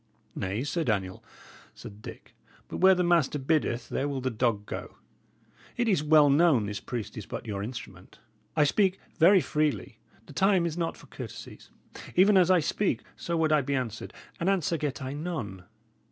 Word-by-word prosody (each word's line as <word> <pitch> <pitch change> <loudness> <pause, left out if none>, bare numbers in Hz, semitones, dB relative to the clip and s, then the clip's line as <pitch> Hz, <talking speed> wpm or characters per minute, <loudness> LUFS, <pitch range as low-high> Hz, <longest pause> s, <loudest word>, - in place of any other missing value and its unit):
"Nay, 100 +6 -3
Sir 165 +3 -1
Daniel," 95 -7 -2 0.5
said 105 +1 -11
Dick, - - -11 0.3
"but - - -6
where 190 +1 +6
the 180 - +1
master 170 -5 +2
biddeth 135 -4 0
there 140 - -1
will 140 -2 -3
the 130 0 -2
dog 110 -3 0
go. - - -7 0.8
It 240 - +1
is 190 -9 +2
well 150 -1 +6
known 140 -5 +4
this 105 0 -4
priest 120 -5 -6
is - - -9
but - - -6
your 100 -3 -4
instrument. 100 -4 -8 0.4
I 155 - +4
speak 190 +5 +2 0.2
very 185 +3 +7
freely; 150 -8 -1 0.3
the - - -13
time 190 +1 +3
is 165 -2 -2
not 170 -1 -2
for - - -15
courtesies. - - -10 0.5
Even 195 +3 +5
as 185 -2 +5
I 185 -2 +5
speak, 150 - -1
so 170 0 -3
would 160 -1 +2
I 155 -1 +4
be 140 +1 -2
answered. 115 -5 -4 0.3
And 170 - +1
answer 180 -4 +1
get 145 -3 -3
I 130 +1 -4
none! 130 - -5
145 Hz, 180 wpm, -28 LUFS, 115-170 Hz, 0.8 s, very